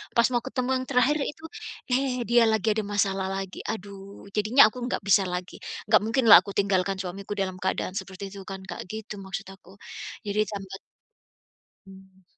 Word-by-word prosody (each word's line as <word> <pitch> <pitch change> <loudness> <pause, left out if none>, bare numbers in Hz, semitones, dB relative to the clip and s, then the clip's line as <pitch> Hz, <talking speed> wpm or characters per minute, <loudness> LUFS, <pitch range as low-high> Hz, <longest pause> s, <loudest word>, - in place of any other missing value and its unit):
Pas 235 -1 +5
mau 240 - +2
ketemu 255 -1 -2
yang 255 - -4
terakhir 270 +3 +3
itu, 320 +2 -6 0.5
eh, 255 -1 +1
dia 240 0 +6
lagi 220 -1 +1
ada 220 - 0
masalah 195 -2 0
lagi. 195 -1 -5
Aduh, 200 -2 -7
jadinya 215 +2 +6
aku 250 - -9
nggak 205 - -2
bisa 200 0 +4
lagi. 180 0 -5 0.3
Nggak 215 - +7
mungkinlah 230 -1 +8
aku 200 - -7
tinggalkan 195 -1 +1
suamiku 195 +2 -5
dalam 185 -2 -2
keadaan 190 0 -1
seperti 195 0 -8
itu 200 -1 -9
kan, 195 0 -7
Kak? 190 - -7
Gitu 215 +1 -6
maksud 195 0 -6
aku. 190 0 -16 0.5
Jadi 205 0 -2
tambah 195 -2 -7 1.1
mmm. 190 0 -16
200 Hz, 170 wpm, -26 LUFS, 190-225 Hz, 1.1 s, mungkinlah